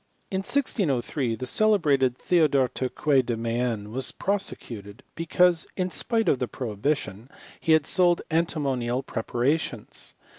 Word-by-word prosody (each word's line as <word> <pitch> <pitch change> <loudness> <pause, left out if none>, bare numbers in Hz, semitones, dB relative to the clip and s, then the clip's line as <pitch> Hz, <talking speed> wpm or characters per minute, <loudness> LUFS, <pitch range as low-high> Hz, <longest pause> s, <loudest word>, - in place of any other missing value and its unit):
In 190 - 0
1603 150 - 0
the 130 - -6
celebrated 145 - +3
Theodore 145 -7 +2
Turquet 135 +2 +1
de 120 -1 -2
Mayenne 115 -2 -2
was 130 +3 -1
prosecuted, 120 - -3
be 165 0 -6
cause, 180 0 +3
in 185 -1 -1
spite 225 +3 0
of 130 - +3
the 125 - -1
prohibition, 115 -1 -3 0.3
he 160 - +2
had 155 -2 +4
sold 175 0 +3
antimo 155 -4 0
nial 125 +2 -2
preparations. 120 0 -2
135 Hz, 135 wpm, -26 LUFS, 120-170 Hz, 0.3 s, had